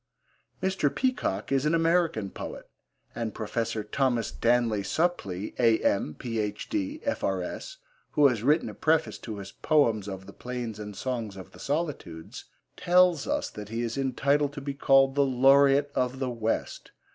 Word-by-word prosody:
Mr. 190 -6 +1
Peacock 250 - -1
is 135 -1 +2
an 155 +2 +2
American 165 - +1
poet, - - -7 0.5
and 115 -3 -4
Professor 110 0 -2
Thomas 120 0 0
Danleigh 115 -3 +1
Supplee, 105 - -1
A.M., 110 -8 +2
Ph.D., 125 - -3
F.R.S., 290 +11 -3 0.4
who 150 - +4
has 120 -6 0
written 150 +7 +3
a - - -6
preface 160 0 +1
to 110 -3 -7
his 100 0 -8
Poems 115 -10 +2
of 95 -1 -7
the - - -11
Plains 120 -4 -5
and 105 -1 -7
Songs 115 -4 -4
of 95 - -10
the - - -15
Solitudes, 140 - -4 0.3
tells 180 -3 +3
us - - -1
that 105 -1 -8
he 115 +2 -2
is 115 -1 -3
entitled 140 +2 +1
to 145 - -6
be 140 0 -4
called 135 -1 +4
the 140 0 +3
Laureate 140 +2 +4
of 125 +1 0
the 130 -1 -2
West. 115 -1 -3
130 Hz, 155 wpm, -27 LUFS, 110-150 Hz, 0.5 s, who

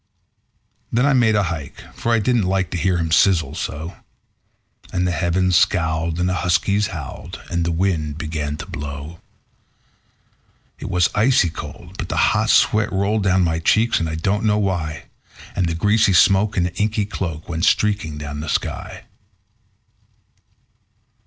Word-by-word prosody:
Then 125 +3 +2
I 145 - +3
made 115 -4 +3
a 105 - +3
hike, 80 -5 -5
for 120 - -2
I 115 - +4
didn't 115 -2 +1
like 95 -1 0
to 90 - -2
hear 90 +2 +1
him 80 -1 -2
sizzle 85 0 +3
so; 80 +4 -5 0.9
And 90 0 0
the 90 - 0
heavens 90 +1 +1
scowled, 80 -1 +1
and 90 - +1
the 90 - 0
huskies 100 +3 +1
howled, 80 - -8
and 85 -1 0
the 85 - -1
wind 80 -4 -1
began 75 -2 -4
to 75 - -7
blow. 75 -1 -7 1.6
It - - -6
was 90 -1 +2
icy 105 -6 +3
cold, 85 +4 -10
but 90 - -4
the - - -2 0.2
hot - - +1
sweat 105 0 +3
rolled 100 +3 0
down 95 -1 +2
my 80 -1 0
cheeks, 110 +8 +2
and 80 - -2
I 80 - -3
don't 95 +7 -1
know 105 -1 +2
why; 90 -7 -2 0.5
And 90 - +1
the 80 - -2
greasy 105 +3 +3
smoke 100 +4 +4
in 90 - +2
an 90 - -3
inky 105 0 0
cloak 85 -6 -5
went 80 0 -1
streaking 100 -8 +1
down 75 0 -6
the 75 +1 -5
sky. - - -3
90 Hz, 165 wpm, -20 LUFS, 80-100 Hz, 1.6 s, I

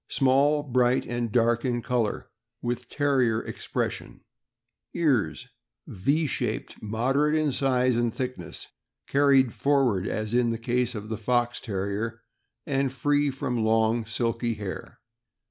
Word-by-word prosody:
— - - -61
Small, 140 +2 +4
bright, 125 -2 +2
and 120 -2 -3
dark 120 0 +2
in 120 -3 -1
color, 120 -4 -1 0.3
with 120 0 -4
Terrier 130 -6 +2
expression. - - -4 0.7
Ears. 130 - +1 0.3
— - - -63
Y 140 - 0
shaped, 120 -6 -3
moderate 135 +8 +1
in 155 -2 +2
size 130 -2 +2
and 120 0 +1
thickness; 120 -8 -5 0.4
car 140 +1 +2
ried 135 -4 +5
forward, 130 -10 +2
as 110 +1 -3
in 120 -1 +3
the 115 - -1
case 120 +1 -1
of 105 0 -6
the 110 -1 -4
Fox 120 +1 0
Terrier, 105 +3 -3 0.4
and 135 -3 0
free 145 +2 +1
from 130 -4 -2
long, 110 0 +2
silky 115 +1 -1
hair. 100 -3 -7
120 Hz, 140 wpm, -26 LUFS, 115-135 Hz, 0.7 s, ried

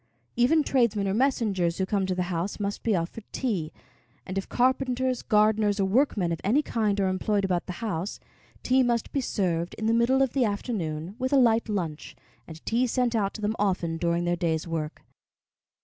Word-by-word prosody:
Even 295 +6 +4
tradesmen 235 -8 +1
or 190 - 0
messengers 210 -8 +1
who 190 - 0
come 195 -1 0
to 185 - -1
the 180 - 0
house 175 +6 -3
must 200 0 -3
be 220 -3 +1
offered 175 +6 -3
tea, 190 -12 -2 0.5
and 185 - -6
if 195 - -3
carpenters, 255 0 +1
gardeners, 210 -1 +2
or 195 - +3
workmen 200 -4 +1
of 165 - -3
any 255 +10 +2
kind 210 -6 0
are 195 - +2
employed 195 +2 0
about 180 -2 -1
the 180 - -4
house, 195 -2 -3 0.4
tea 260 +1 +3
must 240 -2 0
be 275 - 0
served 175 -7 -1
in 220 - -4
the 225 - +3
middle 250 +4 +3
of 265 - -1
the 270 - +2
afternoon 195 -6 -3
with 260 +1 -1
a - - +4
light 230 -3 +3
lunch, 170 -7 -4 0.3
and 160 0 -11
tea 240 +3 +1
sent 245 0 0
out 200 -3 +1
to 215 - -7
them 210 +1 0
often 180 -5 0
during 170 +1 0
their 175 0 +1
day's 165 -2 -1
work. 160 -2 -4
205 Hz, 195 wpm, -27 LUFS, 180-240 Hz, 0.5 s, Even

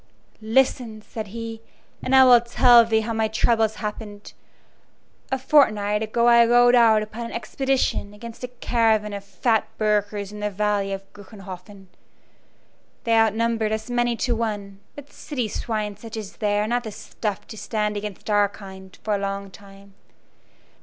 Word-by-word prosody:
"Listen," 225 -1 0
said 220 -1 -7
he, 225 +1 -7 0.4
"and 265 - +1
I 265 - +8
will 245 -2 +7
tell 240 0 +6
thee 225 -1 +1
how 225 +1 -3
my 220 0 +1
troubles 220 0 +1
happened. 210 -1 -7 1.0
A 265 - +1
fortnight 215 -7 +3
ago 225 +2 0
I 235 0 +7
rode 245 +1 +5
out 225 -3 +5
upon 225 +2 -7
an - - -10
expedition 265 -3 -1
against 225 +3 -11
a - - -2
caravan 225 -3 0
of 200 0 -6
fat 215 +3 0
burghers 205 -1 -1
in 210 - -9
the 210 0 -1
valley 205 0 -1
of 195 0 -4
Gruenhoffen. 195 -1 -11 1.2
They 230 - +1
outnumbered 225 0 +1
us 220 +2 -4
many 240 -1 +1
to 245 -2 0
one, 205 -4 -4 0.2
but 285 0 -12
city 255 -7 -4
swine 210 -1 -3
such 225 +2 -9
as 210 -3 -8
they 205 -1 0
are 210 - 0
not 240 +2 +1
of - - -16
the 220 - -5
stuff 205 -1 -5
to - - -8
stand 210 -1 -2
against 205 -2 -6
our 205 -1 +3
kind 190 -2 -12
for 215 - -1
a 200 - 0
long 195 0 -4
time. 195 0 -16
215 Hz, 165 wpm, -23 LUFS, 205-235 Hz, 1.2 s, I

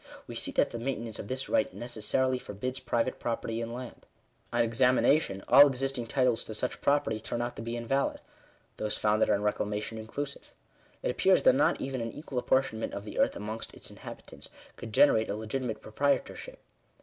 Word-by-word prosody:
We - - -8
see - - -2
that - - +2
the 115 - -5
maintenance 115 -3 -3
of - - -6
this 130 +3 -3
right 280 -1 +2
necessarily 125 +2 -1
forbids 125 +5 -5
private 125 -1 -1
property 115 -1 -2
in 115 0 -4
land. 125 0 -8 0.4
On 120 0 +3
examination 125 -2 +3
all 145 +1 +9
existing 135 -2 -2
titles 125 -1 +2
to 110 - -6
such 125 +4 -3
property 140 -6 +2
turn 120 - -4
out 120 0 -2
to - - -5
be 115 +1 -4
invalid; 120 +4 0 0.6
those 105 0 -2
founded 105 0 +2
on 105 -1 +2
reclamation 105 +1 -2
inclusive. 140 +6 -6 0.5
It - - +1
appears - - +3
that - - +7
not - - +3
even 130 -2 -3
an 115 -1 -4
equal 140 -4 -4
ap - - -9
portionment 130 -4 +1
of 100 - -5
the 105 - -6
earth - - +3
amongst 110 +2 -6
its - - -11
inhabitants - - -10 0.3
could 115 - -8
generate 110 -1 +5
a 100 - -1
legitimate 110 +1 -3
proprietorship. 140 - -1
120 Hz, 185 wpm, -30 LUFS, 110-130 Hz, 0.6 s, all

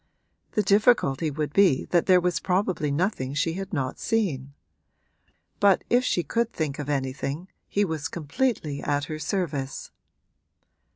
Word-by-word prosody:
The 210 - +2
difficulty 200 - +3
would 150 0 -3
be 185 -10 +4
that 175 -2 +3
there 185 -1 +6
was 175 -1 0
probably 180 -5 0
nothing 140 -3 -1
she 160 +3 0
had 195 +3 -5
not 135 -7 -2
seen; 140 - -1 1.0
but 200 -2 +4
if 245 +1 +4
she 175 -8 +1
could 235 +4 -1
think 150 -3 -3
of 145 -1 -4
anything 140 +5 -3 0.2
he 205 0 +1
was 160 -4 -3
completely 155 - -2
at 145 -1 0
her 155 -1 -5
service. 150 -5 -3
160 Hz, 140 wpm, -26 LUFS, 145-195 Hz, 1.0 s, there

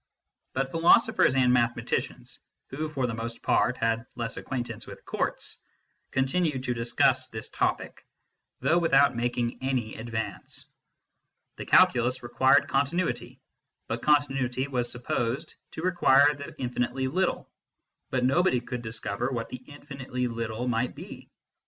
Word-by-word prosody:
But 135 0 -1
philosophers 170 - +4
and 125 -2 +4
mathematicians 120 -1 -1 0.3
who 155 +3 -3
for 135 -4 -1
the 120 - -2
most 115 +1 -5
part 125 - +2
had 115 +1 0
less 115 -2 -4
acquaintance 120 -3 -5
with - - -11
courts - - -3 0.5
continued 135 0 0
to 125 - -1
discuss 120 0 +2
this - - -6
topic, - - -2 0.6
though 170 - +3
without 140 -5 +4
making 120 0 -2
any 130 -4 -1
advance. 110 0 -5 0.9
The - - -7
Calculus 125 +1 +4
required 125 +2 +3
continuity, 150 +6 -1 0.5
and - - -2
continuity 135 -3 +1
was 125 -3 -2
supposed 120 +4 -2 0.2
to 160 - -6
require 150 -6 +5
the 145 -1 -9
infinitely 125 +1 -2
little; 185 +7 -1 0.6
but 125 -1 0
nobody 135 0 +3
could 125 0 -6
discover 110 +1 -3
what 120 -3 -4
the 125 - -7
infinitely 140 -3 -5
little 115 0 -3
might 120 +1 0
be. - - -10
125 Hz, 130 wpm, -27 LUFS, 120-140 Hz, 0.9 s, require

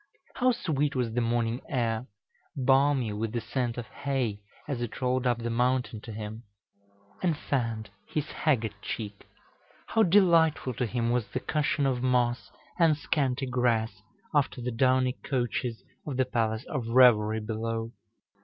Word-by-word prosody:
How 255 0 +3
sweet 150 - -1
was 120 -3 -1
the 120 - +1
morning 115 +1 0
air, 120 -2 -1 0.5
balmy 135 -3 +3
with 110 +2 -3
the 120 - 0
scent 120 +1 -2
of 120 - -4
hay, 125 -8 -2 0.3
as 135 -5 -3
it 120 - -4
rolled 130 0 +1
up 120 -1 +2
the 120 0 -3
mountain 125 -1 0
to 115 - -8
him, 110 +1 -6 0.8
and 170 -5 +1
fanned 115 -7 -2 0.2
his 150 -2 -2
haggard 120 -9 +1
cheek! 105 -3 -6 0.6
How 225 - +1
delightful 170 -8 +4
to 120 +1 -1
him 120 +1 0
was 120 -3 0
the 130 - -3
cushion 150 0 0
of 130 -2 0
moss 125 -1 +1 0.3
and 160 -3 +5
scanty 140 -3 0
grass 120 -3 0 0.3
after 145 -3 +1
the 125 +1 -3
downy 130 +1 +2
couches 120 -2 -2 0.2
of 135 -4 -3
the 130 - +3
palace 110 -2 -1
of 130 -6 -3
revelry 115 -3 +5
below! 115 +1 -3
125 Hz, 155 wpm, -28 LUFS, 115-135 Hz, 0.8 s, and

